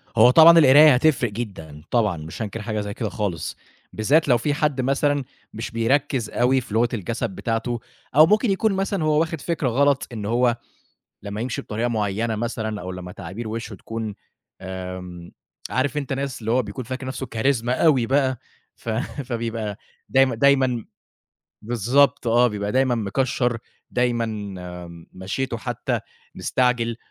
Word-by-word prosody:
هو 110 Hz, +3 st, +7 dB
طبعًا 165 Hz, +4 st, +8 dB
القراية 150 Hz, +1 st, +8 dB
هتفرق 125 Hz, -3 st, +2 dB
جدًا 95 Hz, -9 st, -7 dB
طبعًا 105 Hz, -7 st, +2 dB
مش 80 Hz, +7 st, -8 dB
هانكر 110 Hz, 0 st, -4 dB
حاجة 110 Hz, -1 st, -3 dB
زي 100 Hz, 0 st, -5 dB
كده 110 Hz, 0 st, -3 dB
خالص، 100 Hz, -8 st, -3 dB, 0.4 s
بالذات 145 Hz, +10 st, +2 dB
لو 125 Hz, -3 st, +5 dB
في 145 Hz, +5 st, -1 dB
حد 150 Hz, -2 st, 0 dB
مثلًا 140 Hz, +2 st, +1 dB, 0.3 s
مش 115 Hz, +3 st, -5 dB
بيركِّز 125 Hz, +1 st, 0 dB
أوي 130 Hz, +2 st, +2 dB
في 115 Hz, -, -10 dB
لغة 115 Hz, +2 st, +3 dB
الجَسَد 115 Hz, +3 st, -2 dB
بتاعته 115 Hz, +1 st, -2 dB, 0.4 s
أو 155 Hz, +2 st, +9 dB
ممكن 210 Hz, +5 st, +3 dB
يكون 200 Hz, +2 st, +1 dB
مثلًا 195 Hz, -2 st, -1 dB
هو 155 Hz, -1 st, +3 dB
واخِد 165 Hz, -2 st, -1 dB
فكرة 155 Hz, -3 st, -1 dB
غلط 140 Hz, +3 st, +2 dB
إن 105 Hz, -3 st, -5 dB
هو 120 Hz, +2 st, +2 dB, 0.7 s
لمّا 100 Hz, +1 st, -5 dB
يمشي 120 Hz, 0 st, -3 dB
بطريقة 115 Hz, +3 st, -2 dB
معيّنة 110 Hz, 0 st, -1 dB
مثلًا 110 Hz, -1 st, -3 dB
أو 90 Hz, +1 st, -6 dB
لمّا 90 Hz, -1 st, -7 dB
تعابير 100 Hz, +8 st, -7 dB
وِشّه 115 Hz, 0 st, -5 dB
تكون 110 Hz, +2 st, -5 dB, 0.5 s
آمم 90 Hz, -2 st, -7 dB, 0.4 s
عارف 140 Hz, +3 st, 0 dB
أنت 140 Hz, -2 st, -2 dB
ناس 135 Hz, -1 st, -3 dB
اللي 110 Hz, 0 st, -3 dB
هو 130 Hz, +1 st, +3 dB
بيكون 105 Hz, +4 st, -7 dB
فاكر 130 Hz, +2 st, -5 dB
نَفْسه 130 Hz, 0 st, -4 dB
Charisma 120 Hz, 0 st, +1 dB
أوي 130 Hz, -1 st, +3 dB
بقى، 130 Hz, -1 st, +1 dB, 0.4 s
ف -, -, -11 dB, 0.4 s
فبيبقى 115 Hz, -4 st, -3 dB, 0.3 s
دايم 135 Hz, -2 st, +3 dB
دايمًا 130 Hz, -2 st, +3 dB, 0.8 s
بالضبط 120 Hz, +5 st, +2 dB
آه. 120 Hz, +2 st, +4 dB
بيبقى 105 Hz, -2 st, -2 dB
دايمًا 130 Hz, -1 st, +2 dB
مِكشَّر، 120 Hz, +2 st, 0 dB, 0.3 s
دايمًا 120 Hz, -2 st, +1 dB, 0.9 s
مَشْيِتُه 115 Hz, +7 st, -3 dB
حتّى 110 Hz, -, -3 dB, 0.3 s
مستعجل. 125 Hz, -2 st, 0 dB
120 Hz, 155 wpm, -23 LUFS, 110-135 Hz, 0.9 s, أو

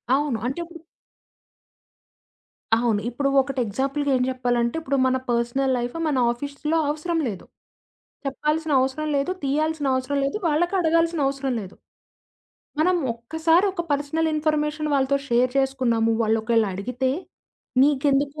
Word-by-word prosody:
అవును. 285 Hz, -5 st, 0 dB
అంటెప్పుడు 335 Hz, +5 st, -5 dB, 2.0 s
అవును. 225 Hz, -3 st, +1 dB
ఇప్పుడూ 275 Hz, +3 st, -1 dB
ఒకటి 275 Hz, 0 st, -4 dB
ఎగ్జాంపుల్‌గా 275 Hz, +7 st, -1 dB
ఏం -, -, -1 dB
జెప్పాలంటే, 245 Hz, 0 st, 0 dB
ఇప్పుడు 275 Hz, -3 st, -1 dB
మన 260 Hz, 0 st, +2 dB
పర్సనల్ 240 Hz, +3 st, +1 dB
లైఫ్ 245 Hz, +4 st, -3 dB
మన 285 Hz, -4 st, 0 dB
ఆఫీస్‌లో 285 Hz, +5 st, -3 dB
అవసరం 325 Hz, +3 st, -1 dB
లేదు. 200 Hz, -5 st, -6 dB, 0.8 s
చెప్పాల్సిన 300 Hz, +2 st, -1 dB
అవసరం 270 Hz, +4 st, -1 dB
లేదు. 275 Hz, +6 st, 0 dB
తీయాల్సిన 300 Hz, +1 st, 0 dB
అవసరం 260 Hz, +2 st, -1 dB
లేదు. 280 Hz, -, -1 dB
వాళ్ళకి 345 Hz, +5 st, +1 dB
అడగాల్సిన 330 Hz, -1 st, +2 dB
అవసరం 275 Hz, -1 st, -2 dB
లేదు. 190 Hz, -1 st, -10 dB, 1.1 s
మనం 360 Hz, +3 st, +3 dB, 0.2 s
ఒక్కసారి 320 Hz, -, +2 dB
ఒక 345 Hz, -2 st, -3 dB
పర్సనల్ 305 Hz, +3 st, 0 dB
ఇన్‌ఫ‌ర్‌మేషన్ 305 Hz, 0 st, 0 dB
వాళ్ళతో 275 Hz, 0 st, +2 dB
షేర్ 245 Hz, +1 st, +2 dB
చేసుకున్నాము, 250 Hz, -4 st, +1 dB
వాళ్ళొకేళడిగితే 225 Hz, +2 st, 0 dB, 0.7 s
నీకెందుకు 285 Hz, +1 st, +2 dB
275 Hz, 115 wpm, -24 LUFS, 245-310 Hz, 2.0 s, మనం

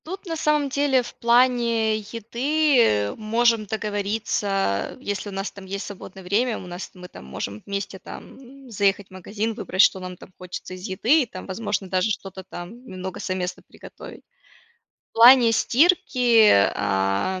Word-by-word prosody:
Тут 380 Hz, +5 st, -7 dB
на 330 Hz, -2 st, -4 dB
самом 300 Hz, -2 st, +1 dB
в 265 Hz, -3 st, +1 dB
плане 235 Hz, -2 st, +3 dB
еды, 245 Hz, +8 st, 0 dB
э, 105 Hz, -, +2 dB
можем 225 Hz, 0 st, +1 dB
договориться, 210 Hz, 0 st, -2 dB
а, 195 Hz, -, -1 dB
если 205 Hz, -4 st, -4 dB
у -, -, -8 dB
нас 195 Hz, +1 st, -4 dB
там 200 Hz, -1 st, -12 dB
есть 195 Hz, +2 st, -5 dB
свободное 190 Hz, -1 st, -10 dB
время, 220 Hz, +6 st, 0 dB
у -, -, -9 dB
нас 180 Hz, +1 st, -7 dB
мы 180 Hz, 0 st, -10 dB
там 65 Hz, -, -13 dB
можем 100 Hz, +10 st, -6 dB
вместе 200 Hz, -1 st, -4 dB
там 265 Hz, +7 st, -12 dB
заехать 200 Hz, -1 st, 0 dB
в -, -, -32 dB
магазин, 205 Hz, +4 st, -4 dB
выбрать, 200 Hz, -3 st, +2 dB
что 190 Hz, -, +3 dB
нам 180 Hz, -1 st, -8 dB
там 185 Hz, -, -15 dB
хочется 180 Hz, 0 st, -8 dB
из 185 Hz, -, -9 dB
еды, 235 Hz, +11 st, +3 dB
и -, -, 0 dB
там, 185 Hz, -4 st, -9 dB
возможно 200 Hz, 0 st, -3 dB
даже 185 Hz, +3 st, 0 dB
что-то 195 Hz, -2 st, -5 dB
там 185 Hz, +7 st, -10 dB
немного 185 Hz, -2 st, -7 dB
совместно 185 Hz, -2 st, -3 dB
приготовить. -, -, -12 dB, 0.9 s
В -, -, -70 dB
плане 235 Hz, 0 st, +7 dB
стирки, 245 Hz, -5 st, +4 dB, 0.2 s
а, 100 Hz, -, -1 dB
210 Hz, 160 wpm, -23 LUFS, 185-240 Hz, 0.9 s, плане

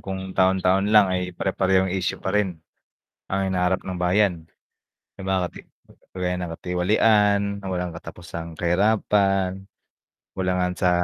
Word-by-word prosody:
kung 95 Hz, -1 st, -6 dB
taon-taon 95 Hz, +1 st, +2 dB
lang 105 Hz, -2 st, +7 dB
ay 90 Hz, -1 st, -2 dB
pare-parehong 95 Hz, -1 st, +1 dB
issue 95 Hz, -2 st, -1 dB
pa 95 Hz, -, -2 dB
rin, 100 Hz, -5 st, 0 dB, 0.7 s
ang 95 Hz, 0 st, -1 dB
hinaharap 90 Hz, 0 st, +1 dB
ng 95 Hz, -1 st, -5 dB
bayan. 90 Hz, -2 st, +1 dB, 0.7 s
'Di -, -, -9 dB
ba 95 Hz, -1 st, +1 dB
kasi -, -, -10 dB, 0.5 s
kagaya 90 Hz, -1 st, -1 dB
ng 90 Hz, -2 st, -4 dB
katiwalian 100 Hz, +3 st, +2 dB, 0.2 s
na -, -, -11 dB
walang 90 Hz, -1 st, -2 dB
katapusang 85 Hz, 0 st, -8 dB
kahirapan, 95 Hz, +1 st, +1 dB, 0.7 s
kakulangan 90 Hz, -1 st, 0 dB
sa 90 Hz, -, +2 dB
95 Hz, 130 wpm, -23 LUFS, 90-95 Hz, 0.7 s, lang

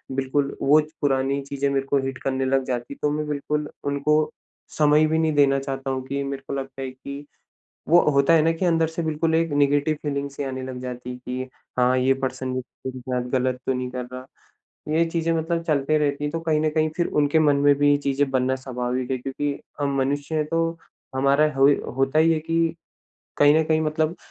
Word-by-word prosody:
बिल्कुल 135 Hz, +1 st, -1 dB
वो 145 Hz, +3 st, +5 dB, 0.2 s
पुरानी 135 Hz, 0 st, +1 dB
चीज़ें 140 Hz, 0 st, -1 dB
मेरे 135 Hz, -1 st, 0 dB
को 140 Hz, -, +2 dB
हिट 135 Hz, -1 st, -4 dB
करने 130 Hz, 0 st, 0 dB
लग 135 Hz, 0 st, +2 dB
जाती। 125 Hz, +2 st, -4 dB
तो 150 Hz, -, +1 dB
मैं 150 Hz, 0 st, -2 dB
बिल्कुल 150 Hz, +1 st, -2 dB, 0.2 s
उनको 150 Hz, +2 st, +1 dB, 0.5 s
समय 150 Hz, 0 st, +5 dB
भी 160 Hz, +1 st, +1 dB
नहीं 160 Hz, -1 st, +1 dB
देना 140 Hz, -1 st, +4 dB
चाहता 135 Hz, 0 st, -4 dB
हूँ 130 Hz, -1 st, -3 dB
कि 140 Hz, +1 st, -2 dB
मेरे 140 Hz, 0 st, -5 dB
को -, -, -4 dB
लगता 135 Hz, 0 st, -7 dB
है 130 Hz, -, -3 dB
कि, 140 Hz, +2 st, -9 dB, 0.6 s
वो 175 Hz, +2 st, +7 dB
होता 140 Hz, +3 st, +4 dB
है 165 Hz, -, +6 dB
न -, -, +2 dB
कि 185 Hz, -, 0 dB
अंदर 165 Hz, -2 st, +3 dB
से 165 Hz, +1 st, -4 dB
बिल्कुल 160 Hz, +1 st, 0 dB
एक 165 Hz, -1 st, +1 dB
नेगेटिव 145 Hz, +1 st, +2 dB
फ़ीलिंग 140 Hz, -1 st, -2 dB
सी 140 Hz, -, -5 dB
आने 130 Hz, -1 st, -4 dB
लग 130 Hz, -1 st, -6 dB
जाती 125 Hz, -1 st, -6 dB
है 125 Hz, -, -7 dB
कि 125 Hz, +1 st, -5 dB, 0.3 s
हाँ 125 Hz, +1 st, +3 dB
ये 130 Hz, +1 st, +3 dB
पर्सन 130 Hz, 0 st, -4 dB
मेरे 130 Hz, 0 st, -6 dB
साथ 125 Hz, -1 st, -3 dB
ग़लत 130 Hz, -1 st, 0 dB
तो 130 Hz, -, +2 dB
नहीं 125 Hz, 0 st, -3 dB
कर 125 Hz, -1 st, -4 dB
रहा। 130 Hz, 0 st, -7 dB, 0.7 s
ये 165 Hz, +1 st, +3 dB
चीज़े 165 Hz, 0 st, 0 dB
मतलब 165 Hz, +1 st, -1 dB
चलती 155 Hz, -1 st, +1 dB
रहती 145 Hz, -1 st, 0 dB
हैं। 145 Hz, -, -2 dB
तो 165 Hz, -, -2 dB
कहीं 160 Hz, -2 st, +1 dB
न 155 Hz, -, +2 dB
कहीं 155 Hz, 0 st, +1 dB
फ़िर 175 Hz, -, +1 dB
उनके 150 Hz, +1 st, +2 dB
मन 150 Hz, -2 st, +4 dB
में 145 Hz, 0 st, +5 dB
भी 145 Hz, 0 st, +4 dB
ये 145 Hz, -, +4 dB
चीज़ें 140 Hz, 0 st, 0 dB
बनना 130 Hz, 0 st, +1 dB
स्वाभाविक 125 Hz, 0 st, -3 dB
है 130 Hz, -, 0 dB
क्योंकि 135 Hz, +3 st, -3 dB, 0.3 s
हम 140 Hz, -1 st, 0 dB
मनुष्य 140 Hz, +3 st, -1 dB
हैं 155 Hz, -1 st, +1 dB
तो 165 Hz, +1 st, 0 dB, 0.4 s
हमारा 140 Hz, +3 st, +3 dB
होई 135 Hz, +1 st, +5 dB, 0.2 s
होता 135 Hz, +3 st, +2 dB
ही 165 Hz, +1 st, +5 dB
है 160 Hz, -, 0 dB
कि, 165 Hz, +1 st, 0 dB, 0.6 s
कहीं 145 Hz, 0 st, +6 dB
न 160 Hz, -, +3 dB
कहीं 155 Hz, 0 st, +2 dB
मतलब 155 Hz, +2 st, 0 dB
140 Hz, 215 wpm, -24 LUFS, 130-155 Hz, 0.7 s, वो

